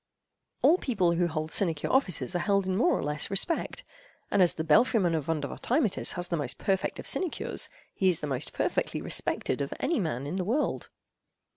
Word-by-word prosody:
All 350 Hz, +4 st, +5 dB
people 190 Hz, -9 st, +1 dB
who 175 Hz, +1 st, +1 dB
hold 155 Hz, -1 st, -4 dB
sinecure 165 Hz, -6 st, 0 dB
offices 190 Hz, -, +1 dB
are -, -, +1 dB
held 200 Hz, +1 st, +1 dB
in 185 Hz, 0 st, -1 dB
more 260 Hz, -, +3 dB
or -, -, -3 dB
less 150 Hz, 0 st, 0 dB
respect, 200 Hz, -, -1 dB, 0.5 s
and 200 Hz, -, +3 dB
as 175 Hz, -, +4 dB
the 160 Hz, -, -2 dB
belfry—man 175 Hz, -, +3 dB
of 155 Hz, -4 st, -2 dB
Vondervotteimittiss 180 Hz, -, 0 dB
has 175 Hz, 0 st, -3 dB
the 170 Hz, -, 0 dB
most 140 Hz, -4 st, -3 dB
perfect 190 Hz, -1 st, -1 dB
of -, -, -8 dB
sinecures, 365 Hz, -4 st, -1 dB, 0.2 s
he 190 Hz, -, +1 dB
is 175 Hz, -, +3 dB
the -, -, -4 dB
most 135 Hz, -1 st, -3 dB
perfectly -, -, -1 dB
respected -, -, -1 dB
of -, -, -3 dB
any 335 Hz, -, 0 dB
man 145 Hz, -, -2 dB
in 160 Hz, +6 st, -3 dB
the 185 Hz, -, -1 dB
world. 245 Hz, +11 st, -1 dB
180 Hz, 190 wpm, -28 LUFS, 160-205 Hz, 0.5 s, All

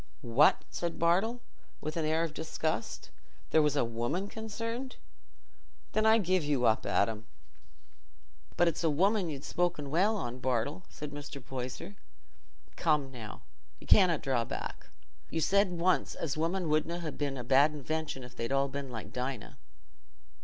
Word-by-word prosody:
"What!" 125 Hz, +6 st, +5 dB
said 170 Hz, -1 st, -3 dB
Bartle, 195 Hz, +9 st, +2 dB, 0.4 s
with 155 Hz, +1 st, -4 dB
an 165 Hz, -2 st, 0 dB
air 160 Hz, +2 st, +2 dB
of 165 Hz, -2 st, -3 dB
disgust. 155 Hz, -5 st, -3 dB, 0.4 s
"Was 150 Hz, -2 st, +4 dB
there 140 Hz, -, +3 dB
a -, -, +1 dB
woman 120 Hz, -, -2 dB
concerned? 230 Hz, +4 st, -5 dB, 1.0 s
Then 215 Hz, 0 st, +2 dB
I 220 Hz, +1 st, +7 dB
give 185 Hz, -4 st, +2 dB
you 145 Hz, -4 st, +1 dB
up, 110 Hz, -, +3 dB
Adam." 110 Hz, +1 st, +1 dB, 1.3 s
"But 175 Hz, -, +5 dB
it's 170 Hz, +1 st, 0 dB
a 165 Hz, -, +4 dB
woman 190 Hz, +4 st, +2 dB
you'n 140 Hz, -2 st, -5 dB
spoke 175 Hz, 0 st, 0 dB
well 175 Hz, +10 st, +2 dB
on, 125 Hz, -7 st, -4 dB
Bartle," 130 Hz, +8 st, -1 dB
said 150 Hz, -1 st, -7 dB
Mr. 145 Hz, -1 st, -7 dB
Poyser. 130 Hz, +9 st, -6 dB, 0.8 s
"Come 150 Hz, -5 st, +1 dB
now, 115 Hz, -5 st, -9 dB, 0.4 s
you -, -, -13 dB
canna 180 Hz, -5 st, +6 dB
draw 130 Hz, -4 st, 0 dB
back; -, -, -6 dB, 0.4 s
you 165 Hz, -, -1 dB
said 200 Hz, +4 st, +3 dB
once 175 Hz, +1 st, +1 dB
as 145 Hz, -5 st, -2 dB
women 170 Hz, +3 st, 0 dB
wouldna 155 Hz, +3 st, 0 dB
ha' 155 Hz, -4 st, -4 dB
been 140 Hz, -2 st, -2 dB
a 125 Hz, -, -4 dB
bad 135 Hz, +5 st, +5 dB
invention 150 Hz, -1 st, -3 dB
if 125 Hz, 0 st, -11 dB
they'd 115 Hz, +2 st, -3 dB
all 135 Hz, 0 st, +2 dB
been 140 Hz, 0 st, -5 dB
like 115 Hz, -3 st, -7 dB
Dinah." 125 Hz, -3 st, -4 dB
155 Hz, 160 wpm, -31 LUFS, 135-175 Hz, 1.3 s, I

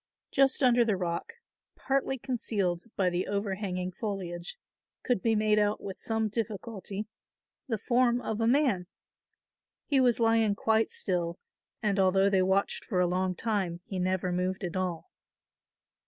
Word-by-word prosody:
Just 270 Hz, 0 st, +3 dB
under 245 Hz, -1 st, +5 dB
the 215 Hz, -4 st, +1 dB
rock, 175 Hz, -, -3 dB, 0.4 s
partly 270 Hz, 0 st, 0 dB
concealed 210 Hz, -9 st, -1 dB
by 185 Hz, -2 st, +2 dB
the 175 Hz, +1 st, -1 dB
over 200 Hz, 0 st, -1 dB
hanging 185 Hz, -2 st, -3 dB
foliage, 180 Hz, -, -5 dB, 0.5 s
could 245 Hz, -6 st, +1 dB
be 225 Hz, -1 st, +2 dB
made 215 Hz, 0 st, +3 dB
out 210 Hz, 0 st, +1 dB
with 195 Hz, -1 st, -7 dB
some 225 Hz, -1 st, -1 dB
difficulty 210 Hz, -1 st, -4 dB, 0.6 s
the 225 Hz, -4 st, -1 dB
form 240 Hz, +2 st, +2 dB
of 220 Hz, -2 st, -3 dB
a 225 Hz, -, +2 dB
man. 245 Hz, -9 st, +2 dB, 1.0 s
He 275 Hz, -3 st, +3 dB
was 245 Hz, -2 st, +3 dB
lying 225 Hz, -2 st, +3 dB
quite 220 Hz, +1 st, +2 dB
still 175 Hz, -3 st, -2 dB, 0.5 s
and 205 Hz, -2 st, +1 dB
although 195 Hz, +1 st, +4 dB
they 190 Hz, -1 st, +4 dB
watched 190 Hz, +2 st, +1 dB
for 185 Hz, -, -1 dB
a 180 Hz, -, +4 dB
long 185 Hz, +1 st, 0 dB
time 195 Hz, -5 st, -1 dB
he 195 Hz, -5 st, -4 dB
never 185 Hz, 0 st, 0 dB
moved 185 Hz, +2 st, -1 dB
at 175 Hz, -1 st, -4 dB
all. 180 Hz, -3 st, -3 dB
200 Hz, 155 wpm, -29 LUFS, 185-225 Hz, 1.0 s, under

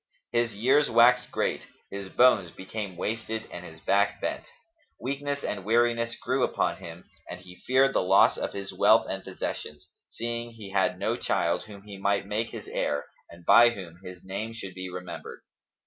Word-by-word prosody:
His 120 Hz, -2 st, 0 dB
years 135 Hz, +8 st, +3 dB
waxed 120 Hz, +2 st, +5 dB
great; -, -, -1 dB, 0.2 s
his 100 Hz, -1 st, -6 dB
bones 120 Hz, -8 st, +4 dB
became 95 Hz, +1 st, -6 dB
wasted 110 Hz, +2 st, -3 dB
and 90 Hz, -, -7 dB
his 80 Hz, -2 st, -11 dB
back 100 Hz, 0 st, +2 dB
bent; -, -, -3 dB, 0.5 s
weakness 140 Hz, +2 st, -3 dB
and 100 Hz, -2 st, -3 dB
weariness 115 Hz, +2 st, +2 dB
grew -, -, -1 dB
upon -, -, 0 dB
him, 85 Hz, +1 st, -10 dB, 0.2 s
and 90 Hz, -, -6 dB
he 90 Hz, 0 st, -14 dB
feared 135 Hz, +1 st, +4 dB
the -, -, +2 dB
loss 95 Hz, +2 st, +5 dB
of -, -, -3 dB
his 100 Hz, -1 st, -6 dB
wealth -, -, +5 dB
and -, -, -4 dB
possessions, 90 Hz, +5 st, -6 dB, 0.2 s
seeing 120 Hz, 0 st, -4 dB
he 105 Hz, -4 st, -10 dB
had 95 Hz, -2 st, +1 dB
no -, -, -1 dB
child -, -, 0 dB
whom 100 Hz, -2 st, -12 dB
he 100 Hz, -2 st, -10 dB
might 100 Hz, 0 st, +1 dB
make 110 Hz, +3 st, -2 dB
his -, -, -8 dB
heir 75 Hz, 0 st, -1 dB, 0.2 s
and 85 Hz, 0 st, -15 dB
by 120 Hz, 0 st, +8 dB
whom 90 Hz, -7 st, -8 dB
his 90 Hz, -1 st, -10 dB
name 105 Hz, +4 st, -5 dB
should 100 Hz, -5 st, -7 dB
be 95 Hz, 0 st, -6 dB
remembered. 90 Hz, -1 st, -8 dB
100 Hz, 180 wpm, -27 LUFS, 90-115 Hz, 0.5 s, by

